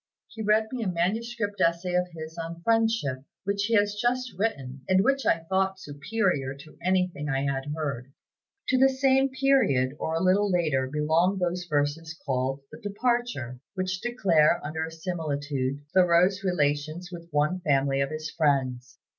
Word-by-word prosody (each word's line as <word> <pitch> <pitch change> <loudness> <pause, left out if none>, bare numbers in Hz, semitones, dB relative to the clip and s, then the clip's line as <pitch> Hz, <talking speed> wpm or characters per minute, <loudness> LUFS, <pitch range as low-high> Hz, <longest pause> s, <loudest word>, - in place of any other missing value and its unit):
He 225 - -8
read 215 +1 +2
me 255 -2 -3
a 215 - -1
manuscript 205 +4 -1
essay 170 +2 +1
of 180 0 +2
his 160 -1 -8
on 165 0 -6
'Friendship,' 225 - +1 0.2
which 200 0 0
he 230 +1 +1
has 205 -1 +3
just 245 +3 -1
written, 140 - -2
and 185 +1 +4
which 275 +2 +1
I 165 - +3
thought 190 +2 0
superior 145 -3 -1
to 145 +3 -14
anything 180 -4 0
I 135 -1 0
had 135 -1 -1
heard." 135 -5 -4 0.6
To 260 - +3
the 270 +1 +6
same 270 0 +3
period 255 - +2
or 160 - -2
a - - +1
little 200 +3 +3
later 155 -7 +1
belong 160 +6 +2
those 180 0 -1
verses 155 +2 -1
called 135 0 -1
"The - - -10
Departure," 205 - -1 0.2
which 185 0 -2
declare, 185 -10 +3
under 160 +1 -3
a - - -9
similitude, 145 -5 -3
Thoreau's 185 +2 +4
relations 155 0 -1
with 170 -1 -9
one 150 +4 +1
family 135 -4 +1
of 135 - 0
his 155 0 -5
friends. 130 -5 0
170 Hz, 165 wpm, -27 LUFS, 145-205 Hz, 0.6 s, the